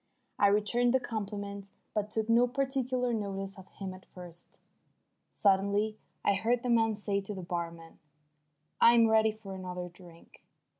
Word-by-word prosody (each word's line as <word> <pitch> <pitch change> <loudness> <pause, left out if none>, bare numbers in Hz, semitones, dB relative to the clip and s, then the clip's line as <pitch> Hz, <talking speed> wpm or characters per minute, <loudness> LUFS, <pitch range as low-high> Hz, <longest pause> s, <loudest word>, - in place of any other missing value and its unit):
I 200 - +6
returned 235 +5 +3
the - - +4
compliment, 200 -3 -5 0.2
but 210 -1 -1
took 220 0 -1
no 235 +2 +5
particular 255 -2 -1
notice 195 -2 -3
of 190 - -13
him 190 -2 -7
at 185 0 -14
first. 175 -2 -12 0.7
Suddenly 200 +2 +2 0.3
I - - +4
heard 230 +5 +1
the 250 - -2
man 225 -2 +3
say 205 -1 -1
to 200 +1 -6
the 185 - -6
barman: 170 -1 -5 0.8
"I'm 235 0 +7
ready 220 0 +4
for 215 -2 -10
another 180 -1 -5
drink." 175 -1 -17
205 Hz, 150 wpm, -31 LUFS, 190-230 Hz, 0.8 s, I'm